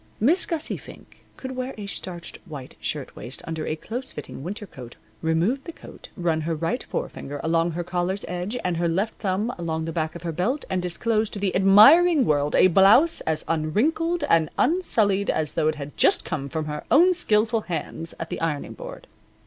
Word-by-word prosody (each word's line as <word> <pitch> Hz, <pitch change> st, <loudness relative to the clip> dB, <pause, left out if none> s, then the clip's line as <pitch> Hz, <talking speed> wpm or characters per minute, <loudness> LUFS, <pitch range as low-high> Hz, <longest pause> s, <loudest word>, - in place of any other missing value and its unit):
Miss 320 Hz, -, +2 dB
Gussie 320 Hz, -2 st, -3 dB
Fink -, -, -15 dB
could 260 Hz, 0 st, -6 dB
wear 255 Hz, +1 st, -4 dB
a 205 Hz, -, -6 dB
starched 180 Hz, -3 st, -6 dB
white 140 Hz, -5 st, -8 dB
shirtwaist -, -, -5 dB
under 160 Hz, -1 st, -4 dB
a 155 Hz, -, -1 dB
close 245 Hz, +10 st, -5 dB
fitting 150 Hz, -, -8 dB
winter 205 Hz, +7 st, -5 dB
coat, 125 Hz, -10 st, -11 dB, 0.3 s
remove 170 Hz, +12 st, 0 dB
the 335 Hz, -, -6 dB
coat, -, -, -13 dB
run 165 Hz, -3 st, 0 dB
her 165 Hz, +1 st, -2 dB
right 165 Hz, +11 st, -2 dB
forefinger 145 Hz, +1 st, -5 dB
along 165 Hz, +1 st, +1 dB
her 175 Hz, +2 st, -3 dB
collar's 180 Hz, +3 st, -2 dB
edge 180 Hz, +6 st, -3 dB
and 180 Hz, -2 st, -1 dB
her 170 Hz, 0 st, +1 dB
left 190 Hz, +7 st, 0 dB
thumb 205 Hz, +4 st, -1 dB
along 160 Hz, -1 st, -2 dB
the 165 Hz, -, -3 dB
back 160 Hz, 0 st, -2 dB
of 170 Hz, -, -8 dB
her 170 Hz, -, -2 dB
belt 220 Hz, -, -1 dB
and 185 Hz, -1 st, 0 dB
disclose 215 Hz, +5 st, 0 dB
to -, -, -7 dB
the 195 Hz, -1 st, -1 dB
admiring 265 Hz, -, +7 dB
world 145 Hz, -2 st, +1 dB
a -, -, +6 dB
blouse 195 Hz, -, +5 dB
as 155 Hz, -1 st, 0 dB
unwrinkled 290 Hz, -, 0 dB
and 160 Hz, -2 st, +3 dB
unsullied 220 Hz, -, +2 dB
as 155 Hz, -2 st, 0 dB
though 155 Hz, -, +1 dB
it 155 Hz, -, +1 dB
had 145 Hz, -1 st, -8 dB
just -, -, +3 dB
come 140 Hz, -2 st, -4 dB
from 160 Hz, 0 st, -3 dB
her 150 Hz, 0 st, -5 dB
own 355 Hz, +5 st, +6 dB
skilful 220 Hz, -8 st, +2 dB
hands 165 Hz, -3 st, -4 dB
at 165 Hz, -, -5 dB
the -, -, -4 dB
ironing 160 Hz, -3 st, -2 dB
board. -, -, -9 dB
180 Hz, 195 wpm, -24 LUFS, 160-230 Hz, 0.3 s, admiring